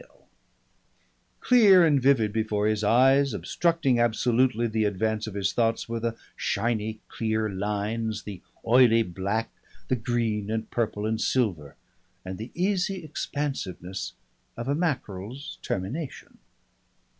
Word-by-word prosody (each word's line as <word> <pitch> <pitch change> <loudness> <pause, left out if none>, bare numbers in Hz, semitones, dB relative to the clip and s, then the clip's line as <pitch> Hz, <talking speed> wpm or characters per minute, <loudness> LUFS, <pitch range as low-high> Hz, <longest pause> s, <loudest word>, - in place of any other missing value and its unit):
_" - - -14 1.4
Clear 205 -8 +6
and 145 -4 +3
vivid 120 -6 +3
before 110 -2 0
his 110 0 +1
eyes, 135 +3 +4
obstructing 165 -3 +1
absolutely 120 +1 +2
the 110 -1 0
advance 110 +2 -1
of 105 - -7
his 100 -1 0
thoughts, 115 -1 0
were 115 0 -3
the 115 0 -2 0.2
shiny 110 -2 -1
clear 110 -1 -1
lines, 105 +2 -2
the 100 -4 -8 0.2
oily 115 -1 +5
black, 100 +4 -3 0.4
the 130 - +3
green 110 -3 -1
and 110 0 -3
purple 105 -3 -1
and 110 0 -1
silver, 90 - 0 0.5
and 95 +1 -6
the 110 +3 -6
easy 190 0 0
expansiveness 95 - -4 0.4
of 120 +1 -5
a 140 - +1
mackerel's 135 - -3
termination. 130 - -5
115 Hz, 125 wpm, -26 LUFS, 105-130 Hz, 1.4 s, Clear